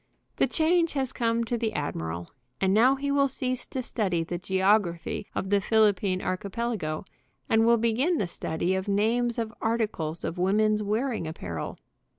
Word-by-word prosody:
The - - +3
change 335 +1 +2
has 270 -3 -1
come 230 0 +1
to 235 +1 -2
the 220 -2 -1
admiral, 85 - -4 0.3
and 190 0 +2
now 245 +6 +5
he 280 +1 -2
will 280 0 +4
cease 255 -1 -3
to 260 - -4
study 185 -9 0
the 175 +1 -4
geography 190 -1 +1
of 190 - -2
the 200 -1 +4
Phil 215 0 +4
ippine 185 -1 -2
archipelago, 195 -4 -2 0.4
and 225 0 +3
will 235 0 +6
begin 240 +10 +1
the 205 - 0
study 170 +1 -2
of 190 +1 -2
names 230 +4 +1
of 225 -1 -2
articles 210 -8 -1
of 175 - -4
woman's 210 +3 +2
wearing 215 -2 -1
apparel. 90 - -5
215 Hz, 165 wpm, -27 LUFS, 185-235 Hz, 0.4 s, will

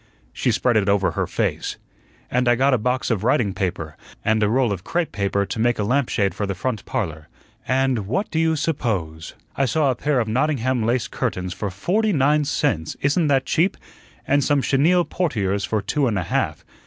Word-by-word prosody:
she 100 - 0
spread 120 +1 +2
it 100 -1 +1
over 100 -1 +2
her - - -2
face - - -2 0.5
"and 125 0 +1
I 120 - +5
got 135 +3 +3
a 125 - +2
box 125 +3 -1
of 105 -3 -1
writing 115 -4 +2
paper, 90 -5 -3 0.3
and 110 0 +2
a 105 - +3
roll 125 -1 +2
of 95 -3 -4
crepe 170 +5 -1
paper 100 -1 0
to 110 - -5
make 120 +1 +2
a 105 - -1
lamp 125 +4 +1
shade 100 -3 +1
for 105 - -3
the 100 - -3
front 110 +2 -3
parlor; 80 -6 -3 0.4
and 130 -5 +1
what 195 - -1
do 160 - 0
you 160 0 +2
suppose 100 - -2 0.2
I 135 - +1
saw 140 +3 +2
a - - -2
pair 145 +2 0
of 115 - 0
Nottingham 130 0 0
lace 115 +1 0
curtains 90 0 -3
for 100 - -4
FORTY 195 - 0
NINE 150 +1 +3
CENTS; 85 - -1
isn't 150 +3 +2
that 135 -2 +2
cheap? 175 +5 +1 0.5
and 145 0 +2
some 145 -1 +2
chenille 170 +6 +3
portieres 100 - -1
for 110 -2 -1
two 135 +7 0
and 110 -4 0
a 90 - -1
half. - - -2
120 Hz, 205 wpm, -22 LUFS, 100-140 Hz, 0.5 s, I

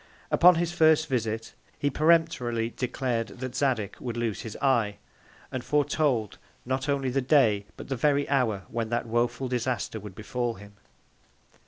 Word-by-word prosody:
Upon 180 +1 +7
his 170 0 0
first 160 -2 +4
Visit, 115 -5 -2 0.2
he 145 - 0
peremptorily 150 -8 +2
declared 125 -2 -1
that 130 0 -7
Zadig 125 -7 0
would 120 -2 -5
lose 115 -5 -2
his 110 - -7
Eye; 120 -7 +2 0.5
and 130 -2 -4
foretold 145 -7 0 0.3
not 130 +3 -2
only 135 -2 0
the 135 +2 +1
Day, 115 -7 +3
but - - -9
the 135 - -2
very 140 +3 +2
Hour 120 -8 +1
when 115 -1 -3
that 120 - -1
woful 120 +3 0
Disaster 120 -4 -2
would 105 -2 -10
befal 120 +2 -3
him. 100 +1 -13
125 Hz, 155 wpm, -27 LUFS, 115-140 Hz, 0.5 s, Upon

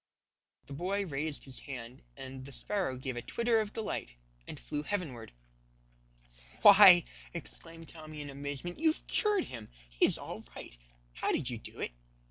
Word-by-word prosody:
The 140 - -9
boy 190 +7 -1
raised 150 -1 -3
his 135 -2 -8
hand, 125 -2 -8 0.2
and 130 0 -7
the 140 - -9
sparrow 175 -2 -2
gave 130 -1 -4
a 120 - -3
twitter 235 - +1
of 210 -1 -4
delight 215 - -3 0.3
and - - -7
flew 105 - -3
heavenward. 150 - -4 1.3
"Why," 195 -4 +10 0.3
exclaimed 165 0 -8
Tommy 155 -2 -9
in 145 -1 -6
amazement, 140 +5 -5
"you've 320 0 +2
cured 420 -4 +2
him! 115 -3 -8 0.2
He - - +4
is - - 0
all - - -7
right. - - -8 0.4
How - - 0
did 125 - 0
you 120 - -4
do - - -10
it? - - -2
150 Hz, 160 wpm, -32 LUFS, 130-195 Hz, 1.3 s, Why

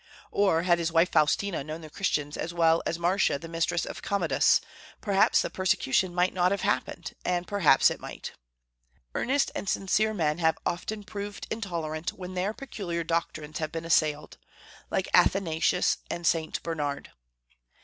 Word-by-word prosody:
Or, 190 -5 +2
had 175 -1 +3
his 165 -1 -1
wife 165 +2 +3
Faustina 165 +2 +2
known 155 +3 -6
the 155 - -10
Christians 150 -6 -1
as 170 +1 -4
well 165 -1 +4
as 165 - -1
Marcia 175 -2 +2
the 165 - -9
mistress 165 +1 -1
of - - -7
Commodus, 200 0 +3 0.4
perhaps 200 -2 +3
the - - -4
persecution 185 -2 +1
might 180 +1 +2
not 180 -1 +3
have 200 +1 -1
happened, - - -2
and 180 0 -1
perhaps 180 -10 +4
it - - -5
might. - - -7 0.8
Earnest 275 +3 +1
and 200 - -4
sincere 215 +3 +1
men 155 -3 0
have 160 -1 +2
often 205 +5 -3
proved 205 0 -6
intolerant 170 -7 -3
when 185 0 -8
their 185 +3 -1
peculiar 195 -9 -5
doctrines 155 -2 -3
have 155 -1 -3
been 165 0 -5
assailed, 150 -2 +1 0.5
like - - -1
Athanasius 180 -1 +3
and 170 0 -4
St. 160 -1 0
Bernard. 150 -4 -3
170 Hz, 160 wpm, -28 LUFS, 160-195 Hz, 0.8 s, well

